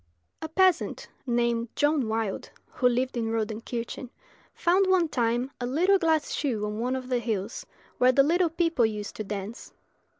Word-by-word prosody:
A 315 - -5
peasant, 370 +1 +2 0.2
named 235 -1 +1
John 290 -4 +2
Wilde, 220 -2 -2 0.2
who 250 - +1
lived 250 +2 -1
in 230 -2 -1
Rodenkirchen, 230 +3 -4 0.4
found, 370 +3 +2
one 370 -3 +3
time, 240 -1 0
a 245 - -1
little 360 +9 +3
glass 320 -3 +1
shoe 235 -8 -1
on 210 +1 -4
one 250 +3 0
of 255 -1 -5
the 250 -1 +1
hills, 220 -2 -3 0.3
where 250 +1 +6
the 275 +2 +5
little 340 +4 +2
people 330 -5 +1
used 210 -2 -2
to 215 - -3
dance. 205 +2 -6
245 Hz, 165 wpm, -27 LUFS, 225-315 Hz, 0.4 s, where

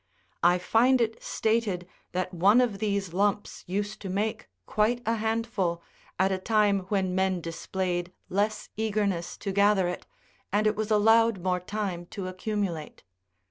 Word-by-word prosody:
I 175 +1 +5
find 240 +8 +3
it 225 -1 -1
stated 215 -6 0 0.2
that 185 +1 -2
one 195 +7 +5
of 230 -6 +1
these 200 -4 -1
lumps 205 +2 0
used 205 +3 -3
to 195 - -5
make 205 +4 -2 0.2
quite 220 +3 +1
a 225 +1 +1
handful, 215 -6 -1 0.3
at 190 +1 +2
a 190 - 0
time 210 -1 +3
when 190 -3 0
men 190 -1 +1
displayed 175 +1 -3 0.2
less 210 +2 -1
eagerness 200 -5 -1
to 200 - -4
gather 200 -1 +3
it, 180 - -5 0.4
and 210 +2 +2
it 215 0 +3
was 215 0 -2
allowed 225 -2 +4
more 180 -1 +1
time 180 -2 -4
to 190 0 -6
accumulate. 185 -4 -3
200 Hz, 150 wpm, -27 LUFS, 185-215 Hz, 0.4 s, I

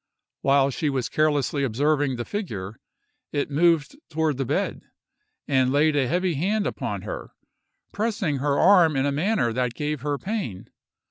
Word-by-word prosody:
While 140 0 +3
she 150 +3 -1
was 130 -3 -2
carelessly 145 -2 +1
observing 140 +2 +1
the 120 -1 -4
figure, 110 - -5 0.5
it 145 0 -2
moved 165 - +2
toward 155 -3 0
the 135 - -1
bed, - - -1 0.7
and 130 -2 +2
laid 150 +2 +3
a 135 -3 +2
heavy 180 +5 0
hand 200 +8 0
upon - - -3
her, - - -7 0.6
pressing 205 -9 -1
her 140 +1 0
arm 175 -5 +5
in 135 0 +1
a 145 - +1
manner 150 - +1
that 125 -1 -1
gave 150 -2 -3
her 145 0 -1
pain. 190 - -5
145 Hz, 155 wpm, -24 LUFS, 135-170 Hz, 0.7 s, arm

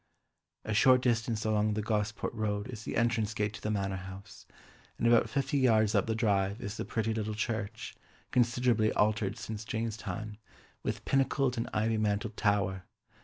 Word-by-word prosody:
A 110 - -2
short 125 +5 +6
distance 115 -2 0
along 105 -1 +2
the 105 - -1
Gosport 105 -1 -1
Road 105 -1 -2
is 115 -3 -7
the - - -4
entrance 115 -2 +1
gate 105 0 -1
to - - -9
the 105 - -2
Manor 100 -2 -1
House, 95 +1 -10 0.5
and - - -2
about 120 0 +5
fifty 140 0 0
yards 110 -4 +4
up 100 -1 +2
the 110 - 0
drive 100 -2 +1
is 105 -3 -5
the - - -3
pretty 110 0 -1
little 110 -1 -2
church, 110 0 -3 0.4
considerably 120 -2 +2
altered 105 0 +1
since 110 0 -6
Jane's 110 0 -3
time, 110 -2 -6 0.4
with - - -4
pinnacled 135 -1 +2
and 115 - -3
ivy 110 +1 +1
mantled 105 +1 -1
tower. 100 -3 0
110 Hz, 170 wpm, -31 LUFS, 105-115 Hz, 0.5 s, short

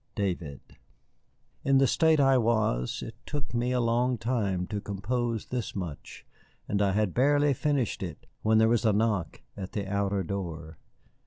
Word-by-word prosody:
"DAVID." 85 -8 -4 0.9
In 135 0 +4
the 135 - +5
state 160 +4 +3
I 135 -1 +5
was 110 - +1
it - - -7
took 145 -6 -5
me 120 +1 0
a 125 - +1
long 120 +1 +1
time 105 -7 -1
to 105 +1 -4
compose 115 +3 -2
this 125 -3 -4
much, 85 -7 -7 0.4
and 105 0 0
I 100 -1 +2
had 105 -2 +1
barely 145 +2 +3
finished 140 -3 0
it 85 -6 -6 0.2
when 110 0 +3
there 110 0 +5
was 115 -1 +2
a 110 -2 +3
knock 105 -5 0
at 95 +1 -7
the 105 -3 -2
outer 100 0 0
door. 80 -4 -5
110 Hz, 165 wpm, -28 LUFS, 95-125 Hz, 0.9 s, the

